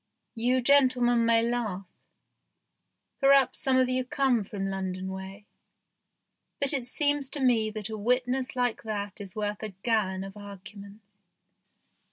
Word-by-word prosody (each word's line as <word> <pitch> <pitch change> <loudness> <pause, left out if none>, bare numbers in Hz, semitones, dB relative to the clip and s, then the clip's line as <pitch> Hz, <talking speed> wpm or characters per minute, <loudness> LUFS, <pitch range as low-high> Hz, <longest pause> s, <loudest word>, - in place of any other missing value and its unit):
You 250 +2 +1
gentlemen 250 -3 +4
may 230 0 +4
laugh 225 -5 -2 1.3
perhaps 275 -1 +4
some 265 -1 +2
of 255 -1 +4
you 255 0 0
come 255 -2 +1
from 195 0 -5
London 190 -1 -4
way 190 +2 -8 1.1
but 280 0 +3
it 255 -4 -2
seems 285 +1 0
to 290 - -4
me 235 -5 +2
that 215 -2 -5
a 220 - -5
witness 250 +3 0
like 245 -2 0
that 205 -2 -5
is 195 -2 -10
worth 210 -1 -3
a 215 -3 -6
gallon 200 -5 0
of 195 +1 -9
arguments. 200 0 -12
225 Hz, 140 wpm, -28 LUFS, 200-255 Hz, 1.3 s, gentlemen